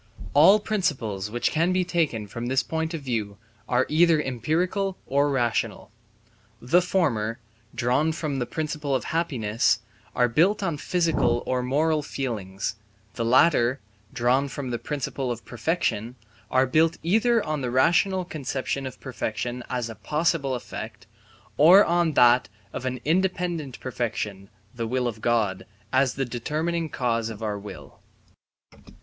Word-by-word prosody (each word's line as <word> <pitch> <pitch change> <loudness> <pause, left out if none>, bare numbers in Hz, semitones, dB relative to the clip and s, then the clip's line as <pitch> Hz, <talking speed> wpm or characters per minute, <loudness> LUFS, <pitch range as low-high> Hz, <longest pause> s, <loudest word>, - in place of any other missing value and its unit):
All 170 +9 +7
principles 130 - -2
which 120 +2 0
can 165 +3 +2
be 185 0 +1
taken 160 -12 0
from 115 +4 -6
this 130 +1 +1
point 160 +1 -2
of 155 - -6
view 110 -6 -3 0.3
are 125 +1 +3
either 165 +1 +4
empirical 170 - -1
or 140 +2 +2
rational. 120 -5 -1 0.7
The 170 +9 +3
former, 120 - 0 0.4
drawn 130 +6 +1
from 155 -4 -3
the 120 - -2
principle 150 -2 -2
of 130 - -1
happiness, 120 -11 +1 0.4
are 125 - +4
built 175 - +2
on 170 -5 -1
physical 165 -8 +1
or 130 0 0
moral 150 +5 +1
feelings; 105 -9 -4 0.4
the 115 - -3
latter, 130 +1 +4 0.3
drawn 130 +3 +2
from 135 -1 -5
the 120 - -2
principle 135 -1 -3
of 120 -1 -6
perfection, 120 -4 -2 0.3
are 130 0 +3
built 160 +5 +2
either 225 +6 +2
on 155 -2 -2
the 125 - -2
rational 175 +8 +2
conception 135 -3 -3
of 130 - -10
perfection 120 -1 -4
as 125 -2 -2
a 115 - -7
possible 140 - 0
effect, 110 -2 -7 0.5
or 180 +7 +8
on 170 -2 +2
that 125 -1 +5 0.2
of 130 - -5
an 130 0 -3
independent 175 -4 -1
perfection 105 -6 -4 0.2
(the 115 -1 -3
will 125 +1 0
of 110 -2 -5
God) 110 -5 0 0.3
as 130 -1 +3
the 135 - -1
determining 155 +7 -2
cause 115 -4 -1
of 110 0 -8
our 105 -1 -2
will. 100 +1 -11
130 Hz, 145 wpm, -25 LUFS, 120-160 Hz, 0.7 s, or